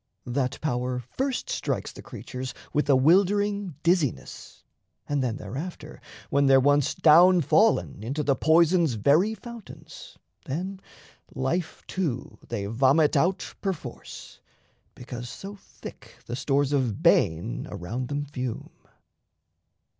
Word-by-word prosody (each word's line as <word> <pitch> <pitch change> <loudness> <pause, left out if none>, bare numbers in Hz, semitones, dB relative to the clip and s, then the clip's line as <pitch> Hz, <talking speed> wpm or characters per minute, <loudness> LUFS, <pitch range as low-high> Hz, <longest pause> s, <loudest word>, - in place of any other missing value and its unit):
That 130 +1 -2
power 125 -4 -1
first 270 - -2
strikes - - -2
The - - -11
creatures 130 -1 -7 0.2
with 150 0 0
a 140 - +6
wildering 200 +5 +2
dizziness, 165 - -1 0.4
And 145 -1 0
then 120 -4 -1
thereafter, 150 - -7 0.3
when 140 0 +3
they're 135 0 +6
once 145 +1 +2
down 175 +3 +6
fallen 210 - +2
Into 135 +7 -3
the 140 -1 +2
poison's 165 +1 +3
very 155 - +3
fountains, 235 0 -12 0.3
then 185 +7 -4 0.5
Life, 155 +6 -2
too, 155 -10 -4
they 105 -4 -3
vomit 135 +8 +3
out 175 +7 0
perforce, 190 -5 -6 0.6
because 120 -1 -8
So 200 +1 -8
thick - - -13
the 120 - -4
stores 140 +2 0
of 125 -7 -1
bane 80 -6 +2
around 115 +9 -5
them 145 +1 -3
fume. 130 -4 -5
145 Hz, 120 wpm, -26 LUFS, 130-180 Hz, 0.6 s, a